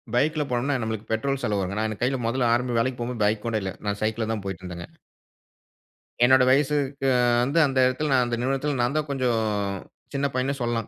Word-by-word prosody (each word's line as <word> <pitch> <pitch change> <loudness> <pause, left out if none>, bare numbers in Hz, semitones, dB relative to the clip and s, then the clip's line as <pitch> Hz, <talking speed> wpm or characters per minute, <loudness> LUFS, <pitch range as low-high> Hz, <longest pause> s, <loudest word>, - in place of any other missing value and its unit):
பைக்கில 150 +4 +2
போனோன்னா, 125 +3 0
நம்மளுக்கு 110 -1 -4
பெட்ரோல் 135 +5 -1
செலவு 105 -4 0
வருங்க. 95 +2 -3
நான் 110 - +1
என் 110 - -8
கைல 135 +2 +1
மொதல்ல 120 0 +1
ஆரம்ப 120 0 0
வேலைக்கு 125 +1 -1
போம்போது 120 -2 -2
பைக் 105 0 0
கூட 115 -1 0
இல்ல. 95 - -3
நான் 100 0 -1
சைக்கிள்ல 110 0 -1
தான் 105 -3 -4
போயிட்டுருந்தேங்க. 90 -2 -6 1.4
என்னோட 130 +1 +6
வயசுக்கு 140 0 +1 0.4
வந்து, 140 +6 -1
அந்த 135 -1 -3
இடத்துல 140 +4 -1
நான் 125 -2 +4
அந்த 120 0 -1
நிறுவனத்தல 135 +2 -1
நான் 120 +4 0
தான் 155 -1 -1
கொஞ்சம் 125 -4 +1 0.7
சின்ன 140 0 0
பையன்ன்னு 135 +2 -1
சொல்லாம். 115 -2 -1
125 Hz, 190 wpm, -25 LUFS, 110-135 Hz, 1.4 s, என்னோட